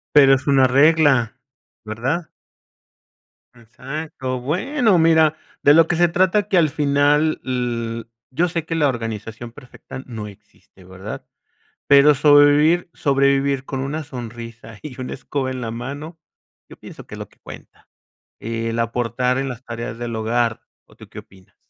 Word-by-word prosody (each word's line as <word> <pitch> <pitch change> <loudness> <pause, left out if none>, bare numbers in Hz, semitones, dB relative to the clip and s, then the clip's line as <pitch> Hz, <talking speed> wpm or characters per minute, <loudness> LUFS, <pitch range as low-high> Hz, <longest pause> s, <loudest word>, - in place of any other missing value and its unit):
Pero 135 -2 +7
es 130 - -5
una 135 -2 +5
regla, 140 -3 +3 0.5
¿verdad? 130 +10 -3 1.3
Exacto. 130 +2 -6
Bueno, 200 - +1
mira, 160 -2 +4 0.3
de 145 - +6
lo 165 0 +5
que 175 - 0
se 175 +1 +4
trata 185 +4 +1
que 195 - +1
al 160 -3 +4
final, 145 +1 +1
l 120 -2 -3 0.3
yo 175 +4 +2
sé 165 -1 -3
que 165 - -4
la 160 -3 +2
organización 115 -1 -5
perfecta 125 +2 -11
no 110 -4 -7
existe, 100 -1 -18
¿verdad? 95 +3 -9 0.6
Pero 140 +1 +6
sobrevivir 145 +4 +4
sobrevivir 140 -1 +1
con 135 0 -5
una 145 +4 -3
sonrisa 115 -3 -9
y 135 -4 -9
una 130 - -5
escoba 135 0 -4
en 130 -1 -5
la 115 -2 -4
mano, 145 +8 -7 0.5
yo - - -12
pienso - - -12
que - - -9
es - - -10
lo - - -8
que - - -29
cuenta. - - -13 0.5
El 115 0 -3
aportar 125 +2 -1
en 135 0 -2
las 125 0 -8
tareas 115 -1 -6
del 120 -1 -5
hogar, 115 +1 -1 0.3
¿o - - -21
tú - - -15
qué - - -12
opinas? 95 -1 -16
135 Hz, 155 wpm, -20 LUFS, 115-150 Hz, 1.3 s, Pero